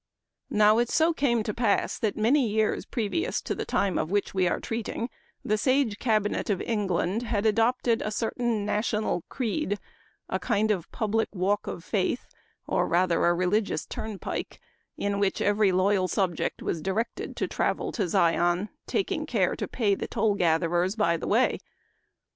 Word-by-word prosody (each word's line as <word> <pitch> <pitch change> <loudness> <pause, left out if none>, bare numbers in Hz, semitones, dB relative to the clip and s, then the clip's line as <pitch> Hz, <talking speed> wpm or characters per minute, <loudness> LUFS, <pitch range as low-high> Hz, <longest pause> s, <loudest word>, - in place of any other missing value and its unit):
" - - -56
Now 215 +2 +6
it 240 0 +1
so 330 +1 +3
came 240 -7 +1
to 210 - -3
pass 225 -3 +1
that 215 -3 -1
many 245 +4 +3
years 215 0 0
previous 275 - -1
to - - -2
the - - -4
time 195 -3 0
of 155 - -2
which 205 +1 0
we 185 -2 +2
are - - 0
treating 230 +1 -4 0.3
the 215 0 +1
sage 255 -4 +1
cabinet 215 -4 0
of 195 -3 +1
England 205 -1 0
had 225 -3 -1
adopted 230 +2 +2
a - - -2
certain 225 0 -1
national 210 -2 0
creed, 235 -3 -1 0.5
a - - -2
kind 215 -2 +1
of 180 -5 -2
public 220 0 0
walk 195 +3 0
of 170 - -5
faith, 200 +5 -1 0.4
or - - +1
rather 175 -1 +2
a 175 - +3
religious 185 +4 0
turnpike, 215 -3 -5 0.4
in 200 0 -1
which 200 -1 +1
every 205 -1 +3
loyal 185 +1 +2
subject 185 -3 -1
was 165 - -2
directed 195 +7 -3
to - - -1
travel - - -1
to 230 - -3
i - - +2
Zion, 175 +4 +2 0.2
taking 375 -6 -1
care 200 -9 +1
to - - -4
pay 215 -5 +1
the - - -3
toll 215 -2 +1
gatherers 175 +1 +1
by 190 -7 +2
the 165 - -4
way. - - +2
210 Hz, 170 wpm, -27 LUFS, 190-230 Hz, 0.5 s, Now